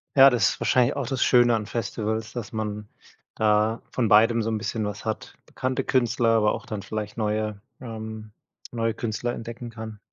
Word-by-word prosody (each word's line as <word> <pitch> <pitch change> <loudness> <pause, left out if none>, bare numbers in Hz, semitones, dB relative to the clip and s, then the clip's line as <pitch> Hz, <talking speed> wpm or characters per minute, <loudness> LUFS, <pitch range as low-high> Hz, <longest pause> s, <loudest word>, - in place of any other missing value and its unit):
Ja, 135 0 +9
das 120 -2 +3
ist - - -5
wahrscheinlich 125 +2 +3
auch 140 -4 -2
das 130 +1 0
Schöne 120 -2 +5
an 105 -1 -2
Festivals, 110 -1 -3
dass 120 -5 -5
man 105 -1 -4 0.5
da 110 +1 +2
von 120 -3 +1
beidem 115 +2 +5
so 110 - -1
'n 110 - 0
bisschen 110 0 -2
was 105 -1 -5
hat. - - -4
Bekannte 130 0 -2
Künstler, 120 -2 +2
aber 110 -2 +3
auch - - -6
dann 105 -2 -5
vielleicht 105 0 -5
neue 105 -1 -1 0.2
ähm, 110 -2 -7 0.4
neue 115 -2 0
Künstler 120 +1 -3
entdecken 115 +1 -7
kann. 110 -2 -8
110 Hz, 185 wpm, -25 LUFS, 105-120 Hz, 0.5 s, Ja